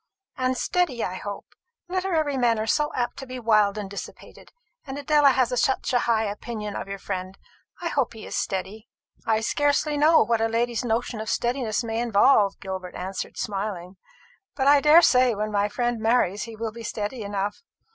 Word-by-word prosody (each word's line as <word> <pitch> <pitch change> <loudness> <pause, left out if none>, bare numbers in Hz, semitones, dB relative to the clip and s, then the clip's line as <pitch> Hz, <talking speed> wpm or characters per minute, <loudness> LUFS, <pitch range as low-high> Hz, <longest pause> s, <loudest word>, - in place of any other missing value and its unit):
"And 255 -1 0
steady, 305 -10 0
I 180 - -2
hope. 200 +2 -6 0.4
Literary 355 -6 0
men 240 -3 +2
are 215 - -1
so 300 +6 +1
apt 245 -1 -2
to 270 - -8
be 255 0 -6
wild 215 -3 +3
and 205 -2 -4
dissipated; 200 +1 -10 0.3
and 270 -1 -7
Adela 290 0 +4
has 255 -2 +2
such 265 -1 0
a 245 - +4
high 225 -1 +3
opinion 210 0 -5
of - - -5
your 195 0 -5
friend. 190 -1 -5 0.5
I 340 - 0
hope 270 -7 0
he 220 - -10
is - - -6
steady." 195 +4 -3 0.4
"I 220 -1 +2
scarcely 290 +4 +1
know 315 +2 +5
what 230 -1 0
a 225 - +3
lady's 235 +1 -1
notion 230 -1 -1
of 220 - -5
steadiness 240 -2 -1
may 225 0 -2
involve," 210 -2 +3
Gilbert 190 -1 -6
answered, 185 +1 -5
smiling; 195 -3 -4 0.6
"but 270 - -1
I 285 0 +6
daresay 260 -6 +6
when 215 +1 -3
my 205 0 +1
friend 240 +1 -1
marries 220 -3 +1
he 230 -1 -9
will 225 0 -4
be 230 +2 -10
steady 220 +2 -4
enough. 200 0 -3
230 Hz, 185 wpm, -25 LUFS, 205-260 Hz, 0.6 s, I